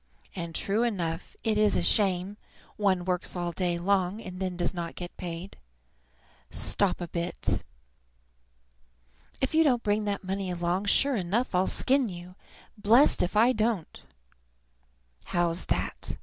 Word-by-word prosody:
And, 170 -2 -5
true 205 +3 +1
enough, 180 -8 -2
it 215 -1 +1
is 210 -1 +4
a - - +1
shame; 195 -1 +2 0.4
one 190 -4 +1
works 180 0 -1
all 175 -1 -2
day 175 0 -1
long, 190 +2 +1
and 185 -4 -8
then 185 -2 -3
does 175 +1 0
not 170 -2 -5
get 175 -1 -7
paid. 175 +2 -6 0.9
Stop 200 -3 0
a 175 - -3
bit! 170 +1 -2 1.8
If 265 - 0
you 320 +1 +5
don't 250 -6 +2
bring 210 0 +1
that 200 -1 -2
money 190 0 -3
along, 175 +2 -1
sure 275 +6 +3
enough 210 +6 -1
I'll 180 +1 +2
skin 265 -3 +2
you, 175 0 -9 0.5
blessed 230 +8 +5
if 180 +4 0
I 235 +4 +6
don't. 215 -6 -1 1.3
How's 175 0 0
that? - - -3
190 Hz, 145 wpm, -28 LUFS, 175-215 Hz, 1.8 s, I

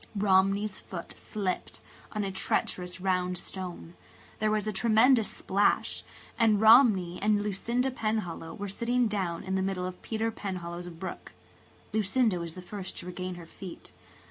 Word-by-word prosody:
Romney's 195 0 +3
foot 170 -3 -7
slipped 195 -4 -3 0.3
on 210 -1 -1
a 195 - -2
treacherous 180 -1 -1
round 180 -1 0
stone–there 95 - -6
was 215 -1 +1
a 215 - -1
tremendous 225 +3 +4
splash–and 205 +2 +1
Romney 215 -6 +6
and 205 0 +3
Lucinda 235 +6 0
Penhallow 215 -9 -2
were 205 - -4
sitting 235 +5 +1
down 190 -5 -2
in 190 - -3
the 190 - +1
middle 190 -1 -1
of 180 0 -6
Peter 225 0 -1
Penhallow's 175 -4 -5
brook. 175 +2 -7 0.6
Lucinda 215 -1 +2
was 170 -1 -5
the 185 - -8
first 190 0 -6
to - - -5
regain 180 0 -5
her 175 -1 -9
feet. 180 +2 -10
195 Hz, 145 wpm, -29 LUFS, 180-215 Hz, 0.6 s, Romney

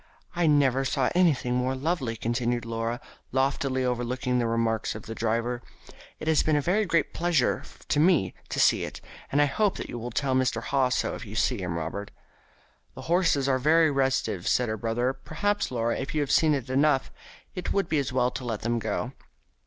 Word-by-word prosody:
"I 175 -1 +2
never 135 -3 +3
saw 130 -1 0
anything 155 -9 +2
more 125 +1 0
lovely," 135 -4 -1
continued 120 +1 -1
Laura, 115 +1 -2 0.3
loftily 130 -1 0
overlooking 125 +1 -1
the 120 - +1
remarks 115 -1 0
of 105 - -8
the 115 - -6
driver. 115 +2 -1 0.6
"It - - -7
has 160 -2 +4
been 155 - +1
a - - +3
very 200 +8 +1
great 165 -3 +1
pleasure 165 -6 +1 0.3
to 145 - +2
me 155 - +3 0.2
to - - -3
see - - +4
it, - - -6 0.3
and 140 - +2
I 145 - +6
hope 200 +8 +1
that - - -6
you 120 - -5
will 120 +2 -5
tell 130 +2 -1
Mr. 130 -3 +1
Haw 135 -2 +1
so 125 - 0
if - - -7
you 105 -2 -9
see 120 -1 +1
him, 85 -2 -3
Robert." 85 +6 -4 0.9
"The - - -8
horses 170 -7 +2
are 130 -1 +2
very 155 +3 +4
restive," 135 -9 0
said 125 -2 +2
her 110 - -1
brother. 120 +4 0
"Perhaps, 205 +9 -2
Laura, 115 -2 -1
if 135 +3 -4
you 150 - +2
have 145 - -1
seen 155 -2 +4
enough, 135 +2 +1 0.4
it 180 -1 -4
would 195 -3 +1
be 155 -4 +1
as 135 - -2
well 125 -1 +1
to 130 - -6
let 115 -4 -3
them 120 +1 0
go." 110 +3 -2
130 Hz, 200 wpm, -27 LUFS, 115-145 Hz, 0.9 s, I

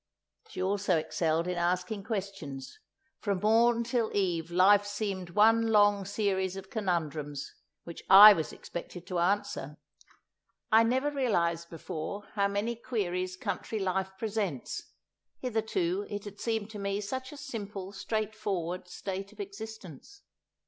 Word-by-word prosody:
She 435 - -4
also 195 -2 +1
excelled 160 +1 0
in 180 -1 -1
asking 180 +3 -1
questions; 195 - -5 0.4
from 200 -3 -1
morn 230 +2 +4
till 235 -1 0
eve 175 -4 0
life 195 +4 +5
seemed 205 -3 -3
one 225 +4 +4
long 205 -2 +4
series 190 -2 -1
of 195 0 -9
conundrums 155 -8 -2 0.3
which 170 - -9
I 205 +2 +12
was 160 -5 -3
expected 175 0 -8
to 180 -2 -2
answer. 170 -6 -1 0.9
I 220 +1 +7
never 260 +5 +1
realized 170 - 0
before 165 +4 -5
how 200 -1 +2
many 205 +4 -1
queries 185 -6 -2
country 220 - -3
life 190 -1 -1
presents; 200 - -3 0.6
hitherto 215 -6 -1
it 205 0 -5
had 205 0 -9
seemed 220 -2 -2
to 210 - -7
me 200 0 -1
such 260 +6 -4
a 295 - -10
simple, 205 -7 -6
straightforward 200 -4 -3
state 195 +2 -5
of 215 - -20
existence. 205 - -9
200 Hz, 135 wpm, -30 LUFS, 180-220 Hz, 0.9 s, I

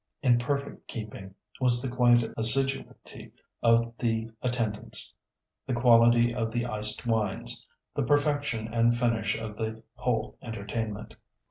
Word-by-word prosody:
In 120 -3 +4
perfect 140 +3 -3
keeping 105 -4 -8 0.2
was 125 -2 +4
the 135 - -3
quiet 120 -2 +4
assiduity 135 +5 0 0.3
of 115 0 +3
the 115 -1 -1
attendants, 115 -4 -1 0.5
the 130 - -1
quality 120 0 +5
of 115 -2 -2
the 120 +1 -1
iced 110 -1 -1
wines, 110 -4 0 0.3
the - - -1
perfection 145 -6 +1
and 120 0 +3
finish 115 -3 0
of 110 -2 -7
the 110 0 -4
whole 110 -3 -2
entertainment. 110 -1 -5
115 Hz, 125 wpm, -28 LUFS, 110-125 Hz, 0.5 s, quality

